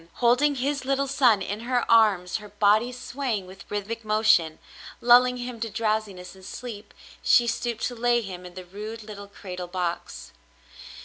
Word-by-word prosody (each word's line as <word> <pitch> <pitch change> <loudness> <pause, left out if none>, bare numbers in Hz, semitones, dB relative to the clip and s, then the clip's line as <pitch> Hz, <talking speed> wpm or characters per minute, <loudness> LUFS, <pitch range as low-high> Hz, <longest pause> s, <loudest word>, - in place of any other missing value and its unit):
Holding 250 +5 +3
his 275 +2 -1
little 275 +1 0
son 250 -7 +3
in 205 +3 -4
her 245 +1 0
arms, 210 -5 +4
her 210 -1 -11
body 210 +4 +3
swaying 245 -4 -3
with 190 +1 -13
rhythmic 210 +3 -4
motion, 215 -7 +3 0.4
lulling 250 +1 +5
him 245 -1 -6
to 225 0 -3
drowsiness 215 -4 -2
and 190 -1 -16
sleep, 215 0 -8 0.3
she 240 - +5
stooped 235 -1 -2
to 250 - -1
lay 240 0 +2
him 185 -4 -8
in 180 -1 -11
the 185 -1 -8
rude 215 +5 -8
little 205 -1 -9
cradle 180 -3 -8
box. 175 -1 -4
220 Hz, 165 wpm, -25 LUFS, 195-245 Hz, 0.4 s, lulling